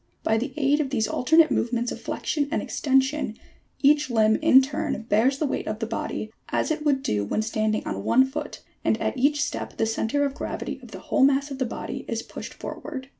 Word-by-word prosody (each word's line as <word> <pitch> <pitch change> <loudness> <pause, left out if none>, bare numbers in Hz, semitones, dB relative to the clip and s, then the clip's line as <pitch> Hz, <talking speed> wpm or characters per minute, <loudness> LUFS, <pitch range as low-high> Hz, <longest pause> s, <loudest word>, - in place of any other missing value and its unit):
By 220 0 +2
the 260 +4 -3
aid 290 0 +3
of 290 -3 0
these 225 -5 0
alternate 320 +5 +4
movements 240 0 0
of - - -6
flexion 290 -2 -2
and 315 - 0
extension 265 -4 0 0.5
each 290 0 +4
limb 220 -2 +4
in 305 -4 +7
turn 295 0 -2
bears 230 +5 +2
the 305 - 0
weight 275 - -2
of 215 - -2
the 225 - -3
body, 220 -1 -4 0.2
as - - 0
it 305 -1 -2
would 280 -3 +1
do 105 -1 0
when 160 - -1
standing 215 -1 -1
on 100 0 -4
one 250 - +5
foot, 295 +2 -6 0.2
and - - +1
at - - -1
each 290 +3 +2
step - - -5
the 225 - +2
centre 225 +5 0
of 280 - -2
gravity 295 - -5
of - - -12
the - - -8
whole 270 - +1
mass 280 +1 +3
of 270 - -6
the 260 - +1
body - - -5
is - - -3
pushed - - -9
for - - -7
ward. 260 -2 -6
265 Hz, 225 wpm, -25 LUFS, 225-290 Hz, 0.5 s, in